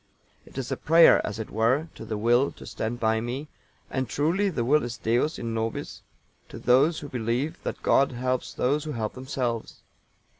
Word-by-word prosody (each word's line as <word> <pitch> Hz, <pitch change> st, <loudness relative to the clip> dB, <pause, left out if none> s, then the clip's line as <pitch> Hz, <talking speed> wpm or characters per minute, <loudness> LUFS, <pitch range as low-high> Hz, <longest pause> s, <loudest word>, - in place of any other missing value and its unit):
It -, -, -14 dB
is 135 Hz, -1 st, -4 dB
a -, -, -1 dB
prayer, 165 Hz, +2 st, +6 dB
as 105 Hz, -, -4 dB
it 110 Hz, -, -6 dB
were, 125 Hz, +9 st, +1 dB
to -, -, -9 dB
the 110 Hz, -, -3 dB
Will 120 Hz, +5 st, +3 dB
to -, -, -12 dB
stand 115 Hz, +2 st, -4 dB
by 110 Hz, 0 st, +1 dB
me, 130 Hz, +6 st, -5 dB, 0.4 s
and 130 Hz, -3 st, -2 dB
truly 175 Hz, +8 st, +1 dB
the 125 Hz, -10 st, -2 dB
will 150 Hz, +4 st, +4 dB
is 120 Hz, -1 st, -5 dB
Deus 120 Hz, +8 st, 0 dB
in 115 Hz, -1 st, -4 dB
nobis 115 Hz, 0 st, -4 dB, 0.5 s
to -, -, -9 dB
those 135 Hz, +7 st, +3 dB
who 145 Hz, -, -6 dB
believe 125 Hz, +4 st, -2 dB
that -, -, -5 dB
God 135 Hz, -1 st, +3 dB
helps 125 Hz, +1 st, -2 dB
those 145 Hz, +4 st, 0 dB
who 155 Hz, -, -4 dB
help 110 Hz, -2 st, -3 dB
themselves. 130 Hz, -3 st, -4 dB
125 Hz, 190 wpm, -26 LUFS, 115-145 Hz, 0.5 s, prayer